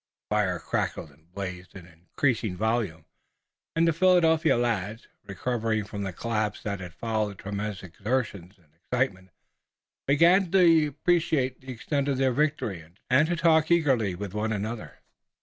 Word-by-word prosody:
The - - +2
fire 95 -4 +1
crackled 80 -1 -3
and 80 +4 -26
blazed 90 -1 -7
in 90 -3 -10
increasing 90 - -2
volume, 105 -7 -1 0.7
and 165 0 +3
the 165 - +3
Philadelphia 165 -4 +4
lads, 115 -2 -2 0.2
recovering 110 +2 -1
from 105 0 -7
the 95 -1 -3
collapse 110 +1 -2
that 100 -2 -3
had 90 -2 -9
followed 110 -3 -2
tremendous 100 0 -5
exertions 100 -1 -3
and 80 -5 -30
excitement, 95 +1 -2 0.8
began 170 +6 +5
to 165 -5 +5
appreciate 150 -4 0
the 130 0 -8
extent 140 +4 -2
of 140 -2 0
their 130 -1 +2
victory 130 - -1 0.3
and 145 +5 +5
to 175 - 0
talk 160 -2 +3
eagerly 135 - +2
with 100 +1 -6
one 110 +1 -1
another. 110 +2 -5
110 Hz, 150 wpm, -27 LUFS, 95-145 Hz, 0.8 s, began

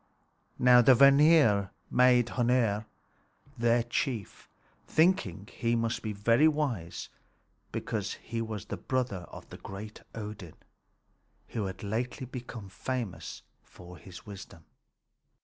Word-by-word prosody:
Now 125 -1 +7
the 125 +2 +6
Vanir 140 -7 +6 0.2
made 125 -1 +5
Hœnir 120 -3 +1 0.7
their 120 -1 +2
chief, 120 -2 -3 0.4
thinking 155 - +2
that - - -17
he 120 -1 0
must 115 0 -1
be 110 - -3
very 115 +8 +3
wise 135 - -2 0.6
because - - -3
he 115 0 -5
was 110 -3 -5
the - - -5
brother 125 -9 -2
of - - -11
great 105 +2 -8
Odin, 105 -6 -7 0.9
who 110 -3 -3
had 95 +2 -8
lately 120 +6 -3
become 120 -4 -8
famous 120 +1 -5 0.2
for 90 0 -14
his 95 -2 -12
wisdom. 95 -5 -11
115 Hz, 115 wpm, -29 LUFS, 100-125 Hz, 0.9 s, Now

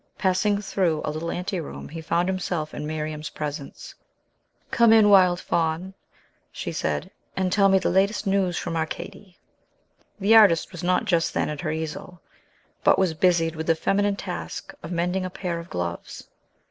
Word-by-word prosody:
Passing 200 +2 +1
through 175 -6 0
a - - -1
little 160 +2 -4
anteroom, 180 -2 -4
he 165 +1 -7
found 170 +2 0
himself 175 -4 -2
in 150 - -5
Miriam's 155 0 -4
presence. 145 -1 -6 0.8
"Come 235 -1 +5
in, 220 -2 +6
wild 180 -3 +6
Faun," 170 +3 -1 0.6
she - - -5
said, - - -2 0.3
"and 190 -1 0
tell 195 0 +4
me 195 - +5
the - - 0
latest 200 +4 +1
news 195 -3 +1
from 165 - -3
Arcady!" 175 +4 -5 0.8
The 210 +3 +4
artist 200 -7 +6
was 175 - -8
not 180 +1 +1
just 170 -3 +1
then - - 0
at 150 -2 -5
her 155 - -2
easel, 160 +3 -5 0.6
but - - +5
was 185 -4 +2
busied 165 -1 +2
with 160 0 -5
the 165 - +4
feminine 200 +4 +1
task 80 - -6
of 155 - -8
mending 180 +2 -1
a 185 - -3
pair 180 -2 -4
of 170 - -10
gloves. 85 -1 -5
175 Hz, 170 wpm, -24 LUFS, 160-190 Hz, 0.8 s, in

